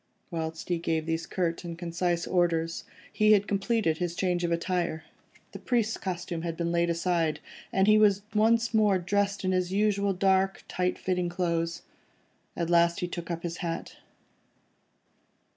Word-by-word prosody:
Whilst 160 Hz, -1 st, -4 dB
he 175 Hz, -1 st, +1 dB
gave 160 Hz, -1 st, -1 dB
these 165 Hz, 0 st, -2 dB
curt 170 Hz, -2 st, -2 dB
and 170 Hz, -1 st, -6 dB
concise 170 Hz, 0 st, -1 dB
orders, 165 Hz, -2 st, 0 dB, 0.3 s
he 215 Hz, 0 st, +5 dB
had 205 Hz, 0 st, +3 dB
completed 200 Hz, -5 st, 0 dB
his 175 Hz, -1 st, -2 dB
change 180 Hz, -1 st, 0 dB
of 170 Hz, -, 0 dB
attire. 170 Hz, -1 st, -1 dB, 0.5 s
The -, -, -8 dB
priest's 230 Hz, -3 st, 0 dB
costume 175 Hz, -2 st, -4 dB
had 165 Hz, -1 st, -4 dB
been 170 Hz, 0 st, -1 dB
laid 170 Hz, 0 st, +1 dB
aside, 170 Hz, -2 st, 0 dB, 0.3 s
and 190 Hz, 0 st, +3 dB
he 215 Hz, +1 st, +6 dB
was 200 Hz, -2 st, +4 dB
once 230 Hz, +2 st, +3 dB
more 210 Hz, -3 st, +4 dB
dressed 200 Hz, +2 st, -1 dB
in 185 Hz, -, +2 dB
his 185 Hz, -1 st, 0 dB
usual 200 Hz, 0 st, +1 dB
dark, 190 Hz, +1 st, +1 dB
tight 180 Hz, 0 st, -1 dB
fitting 180 Hz, -1 st, -1 dB
clothes. 170 Hz, -2 st, -1 dB, 0.7 s
At 170 Hz, 0 st, -1 dB
last 170 Hz, 0 st, +3 dB
he 180 Hz, -, -1 dB
took 175 Hz, -1 st, -6 dB
up 170 Hz, -1 st, -4 dB
his 170 Hz, 0 st, -4 dB
hat. 170 Hz, -2 st, -5 dB
175 Hz, 160 wpm, -28 LUFS, 170-195 Hz, 0.7 s, he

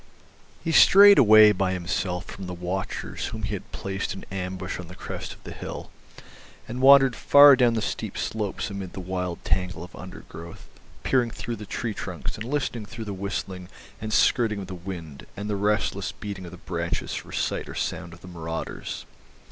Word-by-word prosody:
He 165 Hz, -, -1 dB
strayed 200 Hz, +4 st, +8 dB
away 110 Hz, -2 st, +8 dB
by 95 Hz, -2 st, 0 dB
himself 90 Hz, 0 st, -2 dB
from 95 Hz, -1 st, -8 dB
the 90 Hz, -, -5 dB
watchers 90 Hz, +2 st, -4 dB
whom -, -, -6 dB
he -, -, -2 dB
had -, -, -6 dB
placed 95 Hz, 0 st, -4 dB
in 95 Hz, -, -9 dB
ambush 90 Hz, -1 st, -4 dB
on 90 Hz, -, -7 dB
the 90 Hz, -, -11 dB
crest -, -, -6 dB
of -, -, -13 dB
the -, -, -8 dB
hill, -, -, -7 dB, 0.8 s
and 125 Hz, +3 st, -5 dB
wandered 135 Hz, -2 st, +7 dB
far 145 Hz, -1 st, +8 dB
down 120 Hz, -3 st, +3 dB
the 110 Hz, -, -1 dB
steep -, -, -4 dB
slopes 105 Hz, -1 st, -3 dB
amid 100 Hz, -2 st, -6 dB
the -, -, -6 dB
wild 90 Hz, -1 st, -4 dB
tangle 90 Hz, -3 st, -1 dB
of 90 Hz, -, -11 dB
undergrowth, 85 Hz, -2 st, -10 dB, 0.4 s
peering 125 Hz, -3 st, +2 dB
through 115 Hz, 0 st, -5 dB
the 105 Hz, -1 st, -9 dB
tree 115 Hz, -3 st, -3 dB
trunks 90 Hz, -7 st, -5 dB
and 110 Hz, -, -6 dB
listening 125 Hz, -5 st, -2 dB
through 115 Hz, 0 st, -7 dB
the 100 Hz, -, -4 dB
whistling 95 Hz, -1 st, -5 dB, 0.3 s
and 110 Hz, 0 st, -4 dB
skirling 110 Hz, -1 st, +3 dB
of -, -, -6 dB
the 95 Hz, -, -8 dB
wind 85 Hz, -5 st, -8 dB
and 100 Hz, +1 st, -4 dB
the -, -, 0 dB
restless 105 Hz, +1 st, 0 dB
beating 100 Hz, -3 st, -7 dB
of 85 Hz, -, -9 dB
the 90 Hz, -, -10 dB
branches 85 Hz, -1 st, -3 dB
for -, -, -6 dB
sight -, -, -2 dB
and -, -, -7 dB
sound 85 Hz, -, -3 dB
of 85 Hz, +1 st, -14 dB
the 90 Hz, -, -12 dB
marauders. 80 Hz, -2 st, -5 dB
95 Hz, 190 wpm, -25 LUFS, 90-110 Hz, 0.8 s, strayed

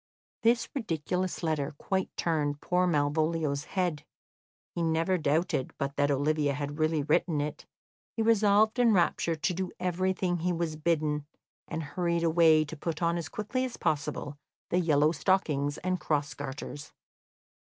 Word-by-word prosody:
This 230 Hz, +1 st, +3 dB
ridiculous 180 Hz, -, -2 dB
letter 155 Hz, -2 st, -1 dB
quite 190 Hz, +3 st, -1 dB
turned 150 Hz, -4 st, 0 dB
poor 180 Hz, +3 st, +1 dB
Malvolio's 150 Hz, -1 st, 0 dB
head. 175 Hz, -6 st, -1 dB, 0.7 s
He 170 Hz, -, -3 dB
never 165 Hz, +3 st, +1 dB
doubted 150 Hz, -2 st, 0 dB
but 140 Hz, -1 st, -3 dB
that 145 Hz, 0 st, +2 dB
Olivia 145 Hz, 0 st, +1 dB
had 145 Hz, +1 st, -4 dB
really 155 Hz, -1 st, +1 dB
written 155 Hz, +1 st, +1 dB
it; 145 Hz, +1 st, -4 dB, 0.5 s
he 225 Hz, -, 0 dB
resolved 215 Hz, +1 st, +4 dB
in 235 Hz, -2 st, +5 dB
rapture 170 Hz, -2 st, +2 dB
to 155 Hz, +3 st, -1 dB
do 185 Hz, +1 st, -3 dB
everything 185 Hz, 0 st, 0 dB
he 175 Hz, +2 st, 0 dB
was 165 Hz, -2 st, -2 dB
bidden, 150 Hz, -2 st, 0 dB, 0.4 s
and 160 Hz, +1 st, -4 dB
hurried 170 Hz, +3 st, -1 dB
away 160 Hz, -2 st, +5 dB
to 155 Hz, -, -8 dB
put 160 Hz, +2 st, -4 dB
on 170 Hz, 0 st, +2 dB
as 165 Hz, -2 st, -4 dB
quickly 235 Hz, +5 st, -2 dB
as 255 Hz, -2 st, -4 dB
possible 145 Hz, -1 st, -2 dB, 0.3 s
the 180 Hz, -, +3 dB
yellow 155 Hz, -3 st, +3 dB
stockings 150 Hz, -5 st, +1 dB
and 185 Hz, 0 st, -1 dB
cross 145 Hz, -3 st, -1 dB
garters. 145 Hz, +1 st, -7 dB
160 Hz, 150 wpm, -29 LUFS, 145-180 Hz, 0.7 s, in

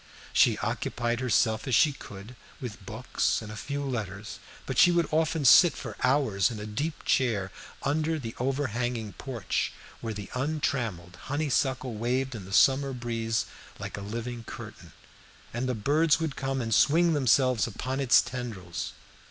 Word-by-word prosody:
She -, -, +5 dB
occupied 120 Hz, 0 st, -1 dB
herself 115 Hz, -3 st, +1 dB
as 130 Hz, -, +2 dB
she 150 Hz, +6 st, +5 dB
could 105 Hz, -1 st, -11 dB, 0.2 s
with 110 Hz, -7 st, -7 dB
books 110 Hz, +6 st, -1 dB
and 110 Hz, -2 st, -8 dB
a -, -, -7 dB
few 140 Hz, +5 st, -4 dB
letters, 105 Hz, -4 st, -5 dB, 0.3 s
but 135 Hz, -, -1 dB
she -, -, +8 dB
would 170 Hz, -2 st, +2 dB
often 160 Hz, -1 st, +1 dB
sit 170 Hz, +5 st, +8 dB
for 110 Hz, -6 st, -7 dB
hours 125 Hz, -6 st, +3 dB
in 115 Hz, -3 st, -6 dB
a 105 Hz, -, -5 dB
deep 145 Hz, +10 st, -4 dB
chair 105 Hz, -8 st, +1 dB, 0.3 s
under 155 Hz, +3 st, 0 dB
the 115 Hz, -6 st, -6 dB
overhanging 120 Hz, -4 st, -1 dB
porch, 120 Hz, -7 st, -2 dB, 0.3 s
where 115 Hz, -2 st, -4 dB
the 100 Hz, -1 st, -7 dB
untrimmed 125 Hz, -, -2 dB
honeysuckle 130 Hz, -3 st, 0 dB
waved 125 Hz, +4 st, -1 dB
in 105 Hz, -5 st, -7 dB
the 95 Hz, -, -11 dB
summer 135 Hz, +5 st, +4 dB
breeze 115 Hz, -2 st, -1 dB, 0.3 s
like -, -, -6 dB
a 100 Hz, -, -6 dB
living 115 Hz, +3 st, -5 dB
curtain, -, -, -9 dB, 0.6 s
and 125 Hz, +2 st, -2 dB
the 125 Hz, -, 0 dB
birds 150 Hz, +9 st, +3 dB
would 160 Hz, -4 st, -2 dB
come 135 Hz, -1 st, -2 dB
and 115 Hz, -1 st, -1 dB
swing 165 Hz, +7 st, +4 dB
themselves 130 Hz, -4 st, +3 dB
upon 130 Hz, +4 st, -4 dB
its 135 Hz, -3 st, +5 dB
tendrils. 115 Hz, -8 st, -5 dB
125 Hz, 160 wpm, -28 LUFS, 110-140 Hz, 0.6 s, she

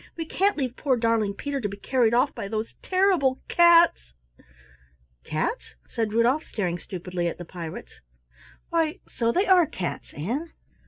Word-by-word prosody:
We 330 Hz, -, -3 dB
can't 390 Hz, +4 st, +1 dB
leave 255 Hz, -4 st, -2 dB
poor 265 Hz, -4 st, +1 dB
darling 225 Hz, -3 st, +1 dB
Peter 280 Hz, +2 st, -3 dB
to 205 Hz, -, -2 dB
be 200 Hz, -, -8 dB
carried 240 Hz, +1 st, +1 dB
off 265 Hz, +3 st, +2 dB
by 200 Hz, -, -5 dB
those 215 Hz, +2 st, -4 dB
terrible 370 Hz, -9 st, +2 dB
cats." 340 Hz, -, +5 dB, 1.1 s
"Cats?" 155 Hz, -, -3 dB, 0.2 s
said 225 Hz, -3 st, -1 dB
Rudolf, 240 Hz, +7 st, +2 dB
staring 175 Hz, -4 st, -3 dB
stupidly 180 Hz, 0 st, -4 dB
at 170 Hz, -, -4 dB
the 175 Hz, -, -8 dB
pirates. 165 Hz, -2 st, -8 dB, 0.7 s
"Why 330 Hz, +1 st, 0 dB
so 230 Hz, -1 st, 0 dB
they 370 Hz, -, +1 dB
are 365 Hz, -5 st, +5 dB
cats, 180 Hz, -8 st, -5 dB
Ann! 250 Hz, -, -4 dB
240 Hz, 155 wpm, -25 LUFS, 200-320 Hz, 1.1 s, cats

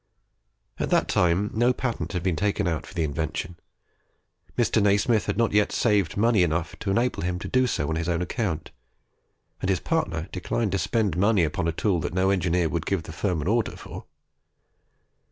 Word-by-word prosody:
At -, -, -1 dB
that -, -, +2 dB
time 90 Hz, +4 st, +2 dB
no 120 Hz, +3 st, +3 dB
patent 125 Hz, -5 st, -3 dB
had 90 Hz, -2 st, -2 dB
been 95 Hz, -3 st, +1 dB
taken 100 Hz, +2 st, 0 dB
out 80 Hz, -3 st, -2 dB
for -, -, -13 dB
the 85 Hz, -, 0 dB
invention. 80 Hz, +3 st, -3 dB, 1.0 s
Mr. 115 Hz, -2 st, +2 dB
Nasmyth 105 Hz, +3 st, +3 dB
had -, -, -1 dB
not 115 Hz, -2 st, +2 dB
yet 105 Hz, 0 st, +3 dB
saved 105 Hz, -8 st, +1 dB
money 110 Hz, -1 st, +3 dB
enough 85 Hz, 0 st, 0 dB
to -, -, -3 dB
enable 120 Hz, +6 st, +1 dB
him 90 Hz, +1 st, -1 dB
to 90 Hz, -, -6 dB
do 130 Hz, 0 st, +2 dB
so 75 Hz, -10 st, -1 dB
on 80 Hz, -, -1 dB
his 85 Hz, +1 st, -2 dB
own 85 Hz, -1 st, +1 dB
account; 95 Hz, -5 st, -3 dB, 0.9 s
and 95 Hz, -, -1 dB
his 95 Hz, -2 st, +2 dB
partner 85 Hz, -, -1 dB
declined 100 Hz, +3 st, -2 dB
to 95 Hz, -, 0 dB
spend 105 Hz, -6 st, 0 dB
money 100 Hz, 0 st, +3 dB
upon 80 Hz, +2 st, -1 dB
a -, -, +2 dB
tool 90 Hz, +2 st, 0 dB
that 85 Hz, -, -4 dB
no 95 Hz, +1 st, +3 dB
engineer 90 Hz, -2 st, +1 dB
would 80 Hz, -1 st, -3 dB
give 95 Hz, -5 st, 0 dB
the 80 Hz, -, -9 dB
firm 90 Hz, 0 st, -1 dB
an -, -, -4 dB
order 115 Hz, +2 st, +1 dB
for. -, -, -9 dB
95 Hz, 195 wpm, -25 LUFS, 85-105 Hz, 1.0 s, no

